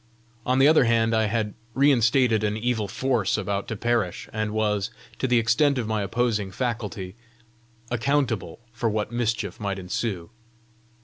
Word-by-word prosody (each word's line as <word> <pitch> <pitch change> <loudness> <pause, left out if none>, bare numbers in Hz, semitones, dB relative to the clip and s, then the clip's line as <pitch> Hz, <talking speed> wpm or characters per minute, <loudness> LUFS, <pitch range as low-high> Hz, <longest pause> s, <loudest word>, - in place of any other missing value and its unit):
On 130 +1 +2
the 135 +1 +6
other 155 -4 +5
hand, 115 -1 +2
I 110 0 +3
had 105 -1 -1 0.2
reinstated 125 -4 +3
an 105 0 0
evil 110 -2 -1
force 120 -1 0
about 100 -1 -2
to - - -3
perish, 115 -5 -1
and 110 0 -1
was, 105 -1 0 0.3
to 130 - 0
the 125 -1 +3
extent 130 +5 +3
of 120 - -1
my 110 -1 -1
opposing 105 0 0
faculty, 105 -5 -3 0.8
accountable 120 - 0
for 115 0 -1
what 105 0 -2
mischief 115 -1 -2
might 100 -2 -2
ensue! 90 0 -3
110 Hz, 150 wpm, -25 LUFS, 105-120 Hz, 0.8 s, the